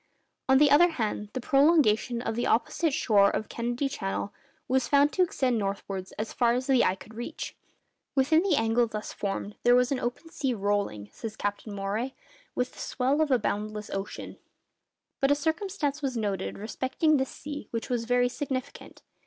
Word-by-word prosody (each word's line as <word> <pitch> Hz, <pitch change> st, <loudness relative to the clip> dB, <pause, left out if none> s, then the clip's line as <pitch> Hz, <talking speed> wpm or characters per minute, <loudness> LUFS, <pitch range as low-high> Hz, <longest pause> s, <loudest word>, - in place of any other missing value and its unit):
On 265 Hz, -, +7 dB
the 290 Hz, 0 st, +5 dB
other 345 Hz, +5 st, +7 dB
hand, 215 Hz, -8 st, -3 dB
the 260 Hz, -, -2 dB
prolongation 260 Hz, -4 st, +3 dB
of 225 Hz, -, -2 dB
the 240 Hz, -, 0 dB
opposite 305 Hz, +7 st, +1 dB
shore 205 Hz, -7 st, +4 dB
of 215 Hz, -, -3 dB
Kennedy 240 Hz, +4 st, -1 dB
Channel 200 Hz, -4 st, -3 dB, 0.3 s
was 260 Hz, 0 st, +1 dB
found 285 Hz, +1 st, +4 dB
to 370 Hz, -, +1 dB
extend 260 Hz, -9 st, +1 dB
northwards 195 Hz, -1 st, -4 dB
as 215 Hz, +1 st, -5 dB
far 235 Hz, -2 st, +3 dB
as 255 Hz, +1 st, -1 dB
the 265 Hz, -3 st, +4 dB
eye 185 Hz, -, +2 dB
could 215 Hz, +3 st, -14 dB
reach. 235 Hz, +2 st, -6 dB, 0.6 s
Within 290 Hz, +4 st, +4 dB
the 370 Hz, -4 st, +2 dB
angle 225 Hz, 0 st, +2 dB
thus 215 Hz, -1 st, -6 dB
formed 200 Hz, +1 st, -4 dB
there 245 Hz, 0 st, +5 dB
was 250 Hz, +1 st, +3 dB
an 270 Hz, -, 0 dB
open 250 Hz, +7 st, -4 dB
sea 265 Hz, -6 st, -1 dB
'rolling,' 200 Hz, -, -1 dB
says 220 Hz, -1 st, -6 dB
Captain 205 Hz, +1 st, -3 dB
Maury, 210 Hz, +6 st, -2 dB, 0.4 s
'with 250 Hz, 0 st, -1 dB
the -, -, -14 dB
swell 270 Hz, +4 st, 0 dB
of 310 Hz, -, +2 dB
a 260 Hz, -, +5 dB
boundless 210 Hz, -1 st, -3 dB
ocean.' 195 Hz, +1 st, -5 dB, 0.8 s
But 275 Hz, -, +3 dB
a 285 Hz, -, +5 dB
circumstance 315 Hz, -1 st, -1 dB
was 265 Hz, -4 st, -2 dB
noticed 200 Hz, -4 st, -2 dB
respecting 260 Hz, +8 st, +1 dB
this 265 Hz, -1 st, -1 dB
sea 290 Hz, 0 st, -7 dB
which 230 Hz, -1 st, -4 dB
was 235 Hz, -2 st, 0 dB
very 245 Hz, +1 st, +3 dB
significant. 265 Hz, +1 st, -5 dB
245 Hz, 180 wpm, -28 LUFS, 215-280 Hz, 0.8 s, On